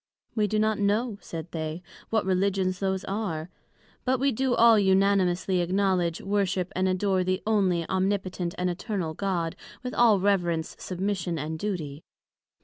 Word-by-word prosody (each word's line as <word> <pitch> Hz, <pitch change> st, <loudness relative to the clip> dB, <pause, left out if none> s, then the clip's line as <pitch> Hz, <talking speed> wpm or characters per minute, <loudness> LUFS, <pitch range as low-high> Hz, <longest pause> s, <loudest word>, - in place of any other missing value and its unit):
We 215 Hz, -3 st, +1 dB
do 215 Hz, -, 0 dB
not 215 Hz, 0 st, +1 dB
know, 205 Hz, +2 st, 0 dB
said 165 Hz, 0 st, -7 dB
they, 160 Hz, +1 st, -4 dB, 0.3 s
what 220 Hz, -3 st, +1 dB
Religions 190 Hz, 0 st, +1 dB
those 190 Hz, -1 st, -1 dB
are; 185 Hz, -5 st, -3 dB, 0.5 s
but 260 Hz, 0 st, +1 dB
we 275 Hz, +1 st, +2 dB
do 260 Hz, +1 st, +1 dB
all 230 Hz, -2 st, +6 dB
unanimously 190 Hz, -1 st, +2 dB
acknowledg, 180 Hz, -1 st, +1 dB
worship 195 Hz, -2 st, -1 dB
and 185 Hz, +1 st, +1 dB
adore 185 Hz, 0 st, +1 dB
the 185 Hz, 0 st, -1 dB
Onely, 190 Hz, -6 st, +2 dB
Omnipotent, 185 Hz, -2 st, -1 dB
and 180 Hz, -, 0 dB
Eternal 180 Hz, -2 st, -3 dB
God, 175 Hz, -2 st, -2 dB, 0.3 s
with 250 Hz, -, -4 dB
all 225 Hz, -4 st, +5 dB
reverence, 175 Hz, -5 st, 0 dB
submission, 185 Hz, -2 st, -2 dB
and 155 Hz, +2 st, -4 dB
duty. 160 Hz, -8 st, -4 dB
190 Hz, 145 wpm, -27 LUFS, 175-205 Hz, 0.5 s, all